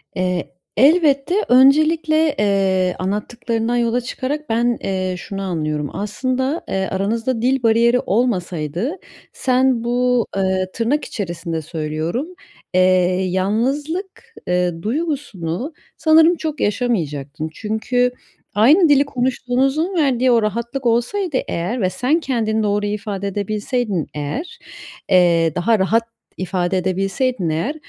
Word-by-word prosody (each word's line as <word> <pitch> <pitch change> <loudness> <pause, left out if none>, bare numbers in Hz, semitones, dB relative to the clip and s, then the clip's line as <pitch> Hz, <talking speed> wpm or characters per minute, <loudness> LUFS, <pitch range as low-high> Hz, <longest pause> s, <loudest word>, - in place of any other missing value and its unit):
Eee, 180 -1 -2 0.3
elbette 285 - +4
öncelikle, 310 +4 +4
eee, 190 -3 +2
anlattıklarından 225 +4 -2
yola 240 0 +1
çıkarak 275 +4 -4
ben, 235 +1 +1
eee, 185 -1 -1
şunu 195 +2 -6
anlıyorum. 155 -6 -2
Aslında, 260 +8 -2
eee, 190 0 -1
aranızda 225 +5 -1
dil 260 +1 +1
bariyeri 235 +2 +4
olmasaydı 190 - -1 0.4
sen 255 -2 +1
bu, 245 -1 +1
ııı, 190 -1 +1
tırnak 260 +6 0
içerisinde 170 -4 -4
söylüyorum, 155 - -3 0.5
eee, 185 - +4 0.5
"yalnızlık", 270 - -1 0.3
ııı, 180 -2 0
duygusunu 260 - -3 0.2
sanırım 320 +2 +5
çok 310 -3 -4
yaşamayacaktın. 160 - -2
Çünkü 225 +5 0 0.4
aynı 300 - +5
dili 285 0 +5
konuştuğunuzun 265 +6 0
verdiği 260 -6 +2
o 235 -1 +4
rahatlık 235 +5 -3
olsaydı 260 - +1
eğer 200 +9 -2
ve 185 - +2
sen 255 - +1
kendini 220 -7 -1
doğru 205 0 0
ifade 205 -1 -3
edebilseydin 205 - -2
eğer, 270 - -5 0.5
eee, 170 -3 +4
daha 215 +5 +2
rahat 220 +5 +2 0.3
ifade 185 0 -1
edebilseydin 195 +3 -1
eğer 165 - -1
230 Hz, 110 wpm, -19 LUFS, 185-260 Hz, 0.5 s, sanırım